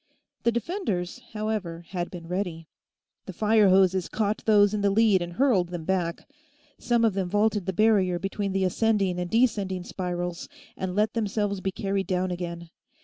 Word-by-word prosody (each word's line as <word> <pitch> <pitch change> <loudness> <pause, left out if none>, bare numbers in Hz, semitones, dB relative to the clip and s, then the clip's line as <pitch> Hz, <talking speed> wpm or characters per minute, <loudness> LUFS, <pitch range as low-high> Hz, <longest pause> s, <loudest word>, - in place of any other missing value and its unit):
The 235 - +2
defenders, 235 - -3
however, 210 -6 -3
had 175 -2 -3
been 170 -2 -9
ready: 175 -3 -3 0.6
the 190 - -6
fire 210 +1 +4
hoses 185 -1 +3
caught 215 -1 -1
those 205 -2 +5
in 210 - -1
the 200 - +3
lead 205 -2 +4
and 175 0 -5
hurled 200 -5 +2
them 175 -3 -6
back. 175 -2 -1 0.5
Some 235 -1 +2
of 220 - +2
them 190 -2 -2
vaulted 205 -1 +1
the - - +1
barrier 195 -3 +3
between 195 +2 -3
the 190 0 0
ascending 195 -2 +1
and 180 0 -3
descending 205 -6 +1
spirals 175 -1 -4 0.3
and 185 -1 -4
let 210 +1 +1
themselves 205 -3 -1
be 190 - -1
carried 195 0 -2
down 185 -1 0
again. 170 -1 -5
195 Hz, 170 wpm, -26 LUFS, 180-215 Hz, 0.6 s, those